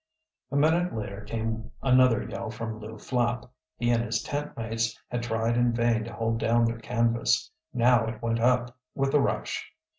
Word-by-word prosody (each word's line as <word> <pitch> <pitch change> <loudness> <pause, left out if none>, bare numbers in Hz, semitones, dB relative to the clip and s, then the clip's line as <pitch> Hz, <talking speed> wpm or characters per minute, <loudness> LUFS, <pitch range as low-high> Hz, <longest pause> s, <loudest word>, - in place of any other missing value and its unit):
A - - -3
minute 160 +4 +3
later 100 -2 -5
came 110 +1 -3
another 130 -3 +5
yell 100 +2 -5
from 110 0 -5
Lew 110 +1 -8
Flapp. 120 0 -1 0.3
He 120 +1 +1
and 115 -1 +2
his 115 0 -1
tent 145 +1 -4
mates 115 -2 -2
had 120 -1 -1
tried 115 0 0
in 120 0 +3
vain 115 -1 +2
to 115 - -8
hold 115 0 -1
down 115 +1 +3
their 115 0 -1
canvas. 115 +2 +1 0.2
Now 120 -2 +4
it 110 -1 -5
went 115 0 0
up 125 +1 +2 0.2
with 135 0 0
a 150 - +6
rush. 140 - -1
115 Hz, 180 wpm, -27 LUFS, 115-125 Hz, 0.3 s, a